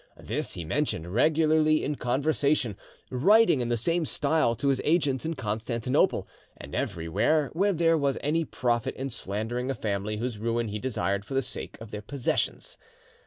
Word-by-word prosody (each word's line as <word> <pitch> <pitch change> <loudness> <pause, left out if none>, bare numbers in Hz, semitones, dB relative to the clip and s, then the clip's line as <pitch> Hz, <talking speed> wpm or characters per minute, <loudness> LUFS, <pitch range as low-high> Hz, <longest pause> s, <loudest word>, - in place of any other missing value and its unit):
This - - -3
he 85 - -5
mentioned 90 - -1
regularly 155 +3 +3
in 150 - -1
conversation, 140 -2 +1 0.4
writing 185 - +5
in 120 - -2
the 120 - +1
same 170 +9 +1
style 150 -5 +1
to 140 +4 0
his 135 -1 +1
agents 150 -3 +1
at 165 -2 -3
Constantinople, 115 +2 0 0.3
and - - -10
everywhere 125 - 0
where 195 +5 +2
there 165 -2 +3
was 140 -2 +1
any 160 +3 +1
profit 120 -6 -1
in 135 0 -4
slandering 110 +6 -3
a 135 - -1
family 105 0 -2
whose 115 -1 -3
ruin 115 0 -1
he 105 +1 -3
desired 100 -5 -1
for 135 - -6
the 135 - +3
sake - - -7
of 115 -2 -10
their 105 - -5
possessions. 120 - -2
130 Hz, 165 wpm, -27 LUFS, 110-155 Hz, 0.4 s, writing